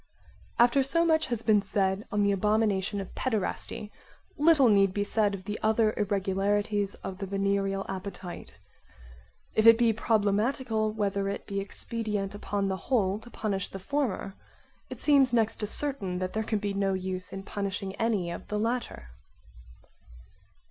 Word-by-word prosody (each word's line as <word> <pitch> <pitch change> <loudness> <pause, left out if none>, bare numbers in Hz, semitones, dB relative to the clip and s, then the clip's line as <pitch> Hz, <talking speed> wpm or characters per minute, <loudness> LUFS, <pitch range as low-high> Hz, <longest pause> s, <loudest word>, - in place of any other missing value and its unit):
/ - - -28
After 245 +3 +2
so 275 +6 +2
much 315 -1 +2
has 240 -3 -3
been 210 -2 +4
said 195 0 -1
on 205 0 +1
the 200 - +3
abomination 205 0 +1
of 195 - -7
paederasty, 215 -2 -2 0.4
little 300 -3 +5
need 195 -3 +4
be 205 - +1
said 205 -1 +1
of 185 - -10
the 210 +2 -5
other 220 0 +2
irregularities 205 +1 0
of 190 -1 -6
the 195 - -4
venereal 195 0 0
appetite. 185 -2 -7 1.0
If 220 +1 +4
it 230 0 +9
be 230 -1 +3
problematical 220 +1 +1
whether 200 -2 -1
it 200 - -5
be 200 0 -3
expedient 205 0 -3
upon 205 -1 -2
the 190 -1 -1
whole 205 -6 +2
to 240 - -13
punish 200 -5 -2
the - - -7
former, 210 -2 -2 0.6
it - - -7
seems 275 -4 +4
next 225 -2 +2
to 210 - -3
certain 210 -8 -1
that 185 0 -3
there 220 - 0
can 220 0 -1
be 205 -1 -2
no 195 -1 0
use 185 0 -4
in 195 0 -6
punishing 195 -1 -4
any 210 -7 0
of - - -7
the 210 - -2
latter. 225 - -2
205 Hz, 160 wpm, -28 LUFS, 195-225 Hz, 1.0 s, it